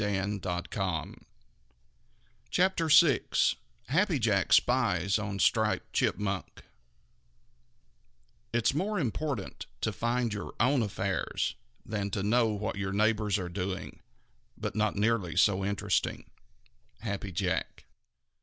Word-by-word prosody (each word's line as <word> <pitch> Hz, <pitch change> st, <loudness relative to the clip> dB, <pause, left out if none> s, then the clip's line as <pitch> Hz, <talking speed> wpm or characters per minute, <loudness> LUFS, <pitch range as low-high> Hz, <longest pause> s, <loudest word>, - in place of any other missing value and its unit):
CHAPTER 180 Hz, -3 st, +2 dB
VI 150 Hz, -4 st, +7 dB, 0.7 s
HAPPY 175 Hz, +3 st, +2 dB
JACK 105 Hz, -5 st, +1 dB
SPIES 100 Hz, -6 st, +3 dB
ON 100 Hz, -2 st, -3 dB
STRIPED 95 Hz, -, +1 dB
CHIPMUNK 100 Hz, -2 st, -1 dB, 1.9 s
It's 120 Hz, +3 st, +2 dB
more 200 Hz, +8 st, -1 dB
important 130 Hz, -2 st, -3 dB
to -, -, 0 dB
mind 120 Hz, -1 st, +1 dB
your 105 Hz, -, -6 dB
own 130 Hz, +2 st, +3 dB
affairs 100 Hz, -2 st, -1 dB, 0.3 s
than 105 Hz, -2 st, -2 dB
to 100 Hz, 0 st, -2 dB
know 115 Hz, +3 st, +3 dB
what 105 Hz, -2 st, -3 dB
your 100 Hz, -1 st, -2 dB
neighbors 105 Hz, 0 st, +2 dB
are 90 Hz, -3 st, -3 dB
doing, 95 Hz, +1 st, -4 dB, 0.6 s
but -, -, -4 dB
not 110 Hz, -1 st, +1 dB
nearly 105 Hz, -6 st, +1 dB
so 95 Hz, -2 st, +3 dB
interesting. 100 Hz, 0 st, -1 dB, 0.8 s
_Happy 100 Hz, -3 st, -3 dB
Jack. 85 Hz, -, -2 dB
105 Hz, 100 wpm, -30 LUFS, 100-125 Hz, 1.9 s, VI